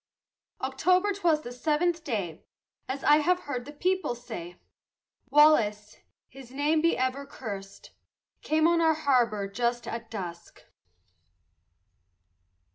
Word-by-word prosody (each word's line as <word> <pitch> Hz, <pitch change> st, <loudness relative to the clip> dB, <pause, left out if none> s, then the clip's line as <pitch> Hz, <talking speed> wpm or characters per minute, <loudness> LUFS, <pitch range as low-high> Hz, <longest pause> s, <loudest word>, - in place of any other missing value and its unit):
October 360 Hz, +10 st, +2 dB
'twas 340 Hz, -6 st, +1 dB
the 245 Hz, -, -8 dB
seventh 315 Hz, +6 st, 0 dB
day, 195 Hz, -, -4 dB, 0.5 s
As 270 Hz, +1 st, -4 dB
I 295 Hz, -, +6 dB
have 360 Hz, +4 st, +1 dB
heard 250 Hz, -4 st, -5 dB
the 290 Hz, -, -9 dB
people 365 Hz, -2 st, -1 dB
say, 175 Hz, -7 st, -9 dB, 0.7 s
Wallace, 225 Hz, -8 st, +4 dB, 0.3 s
his 265 Hz, -2 st, -13 dB
name 295 Hz, +4 st, +1 dB
be 335 Hz, +1 st, +2 dB
ever 260 Hz, +2 st, -1 dB
curst, 200 Hz, -7 st, -9 dB, 0.5 s
Came 315 Hz, +1 st, +2 dB
on 340 Hz, 0 st, +3 dB
our 320 Hz, -1 st, +4 dB
harbor 240 Hz, -9 st, +1 dB
just 240 Hz, +4 st, -2 dB
at 230 Hz, -1 st, -6 dB
dusk. 175 Hz, -5 st, -8 dB
265 Hz, 120 wpm, -28 LUFS, 225-315 Hz, 0.7 s, I